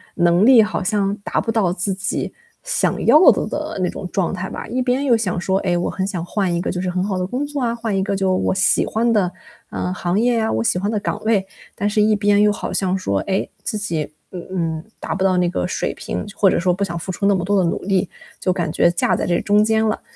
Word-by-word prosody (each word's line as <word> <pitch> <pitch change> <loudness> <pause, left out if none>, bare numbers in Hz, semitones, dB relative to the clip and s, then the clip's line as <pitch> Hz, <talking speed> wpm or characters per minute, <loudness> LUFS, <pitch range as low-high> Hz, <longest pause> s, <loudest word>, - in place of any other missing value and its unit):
能 175 +3 +3
力 245 -4 +8
好 215 - -2
像 200 0 0
达 200 - -2
不 225 - -2
到 205 -6 +1
自 190 +1 -2
己 185 -1 -3 0.3
想 - - 0
要 305 - +7
的 - - -1
的 305 -3 -4
那 180 - +1
种 185 - -6
状 190 -2 0
态 185 0 -4
吧。 - - -6
一 250 +3 -2
边 255 +2 0
又 245 - +4
想 185 -5 -2
说， 190 +1 0
哎， 175 -3 0
我 175 - -1
很 190 0 -2
想 180 -4 -3
换 185 -1 -1
一 170 - 0
个 - - -2
就 180 - -3
是 185 - -2
很 180 +1 -1
好 195 -2 -2
的 180 - -2
工 255 +8 -2
作 290 -1 -4
啊， 235 -1 0
换 230 -3 -3
一 190 - +1
个 195 +1 -1
就 190 -1 +1
我 185 - 0
喜 190 - +2
欢 230 +2 0
的， 205 -5 +2 0.4
嗯， 180 - -2
行 180 +1 -1
业 240 0 +2
啊， 220 - 0
我 110 +1 0
喜 180 - +1
欢 200 +2 -1
的 215 -1 0
岗 - - -3
位。 215 -4 +2 0.3
但 205 - -1
是 210 0 +1
一 215 0 +4
边 205 0 +3
又 210 0 +5
好 - - -4
像 190 -1 0
说， 100 - -1
哎， 190 0 0 0.2
自 215 - -3
己， 165 -8 -3 0.2
嗯 180 -2 -8
嗯， 165 -2 -2 0.2
达 - - -3
不 195 - -4
到 190 -1 +3
那 180 -1 +2
个 180 - -2
水 - - -2
平， - - -5
就 205 - -12
或 195 - +5
者 - - +1
说 180 0 +2
不 190 - -7
想 170 -4 -1
付 180 +3 -5
出 200 - -3
那 200 0 +4
么 180 - -1
多 200 +1 +2
的 170 - +1
努 - - -3
力， 195 -1 0 0.3
就 185 - +1
感 170 -4 -2
觉 170 - +3
架 175 - +1
在 - - -2
这 175 -1 +1
中 205 0 +3
间 220 +1 +2
了。 215 - -1
195 Hz, 295 characters per minute, -20 LUFS, 180-215 Hz, 0.4 s, 力